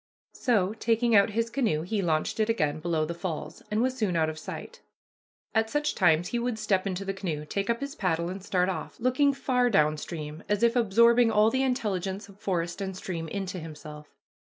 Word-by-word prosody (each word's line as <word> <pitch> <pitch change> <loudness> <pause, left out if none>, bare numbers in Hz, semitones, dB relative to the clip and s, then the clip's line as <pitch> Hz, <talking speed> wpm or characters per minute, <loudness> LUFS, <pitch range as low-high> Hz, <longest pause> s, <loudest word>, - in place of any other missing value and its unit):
So, 210 -7 +1
taking 230 +1 +2
out 200 +1 +6
his 230 0 0
canoe, 225 - 0
he 200 +4 -1
launched 160 +2 0
it 215 +1 +2
again 155 -9 +1
below 160 -1 0
the 170 - -4
falls, 170 -2 -5
and 215 +2 +1
was 260 0 0
soon 210 -8 0
out 160 -1 +2
of 155 - -9
sight. - - -8 0.7
At 220 0 +2
such 295 +4 0
times 175 -1 +3
he 240 - -1
would 240 -1 -2
step 200 -3 0
into 190 +1 -3
the 195 - -2
canoe, 170 -6 -4
take 200 +6 -3
up 235 +2 0
his 280 0 -4
paddle, 170 -3 -1
and 185 +1 -6
start 185 -2 +1
off, 180 -5 -5
looking 255 +4 +3
far 250 -2 +1
down 155 -7 +3
stream 155 -1 -6
as 205 +2 +1
if 235 +1 +4
absorbing 235 +1 +5
all 215 0 +4
the 260 - +1
intelligence 205 -7 -1
of 200 0 -17
forest 175 -1 -2
and 190 -1 -4
stream 170 -4 -4
into 190 +1 -4
himself. 150 -2 -9
195 Hz, 210 wpm, -28 LUFS, 170-230 Hz, 0.7 s, out